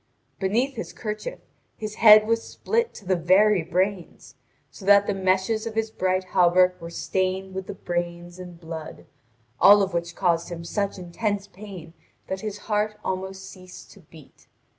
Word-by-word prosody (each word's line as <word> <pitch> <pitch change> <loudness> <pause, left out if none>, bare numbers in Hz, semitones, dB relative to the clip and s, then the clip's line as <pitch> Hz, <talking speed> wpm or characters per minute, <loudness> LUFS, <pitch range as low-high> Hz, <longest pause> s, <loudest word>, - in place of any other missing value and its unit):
Beneath 235 +7 0
his 225 - -6
kerchief 215 - -6 0.4
his 215 -1 -5
head 215 -1 +9
was 230 +1 +1
split 465 - -2
to 205 - -12
the 185 0 +2
very 185 +3 +4
brains, 185 +2 -3 0.4
so - - -13
that 200 +1 +6
the 205 - 0
meshes 190 +4 0
of 220 - -6
his 225 0 -1
bright 185 -2 0
hauberk 180 0 +4
were 170 - -7
stained 190 +2 -2
with 190 0 -5
the - - -6
brains 175 0 -4
and 175 -2 -10
blood, 160 -2 -8 0.5
all 205 0 +8
of 190 -2 -3
which 170 0 -3
caused 170 -3 0
him 170 -1 -6
such 200 +3 -2
intense 200 +3 -3
pain 185 -6 -11 0.3
that 190 0 -5
his 210 -2 -5
heart 210 0 -1
almost 190 +1 -4
ceased 185 -1 -13
to - - -16
beat. 155 -4 -18
190 Hz, 165 wpm, -24 LUFS, 175-210 Hz, 0.5 s, head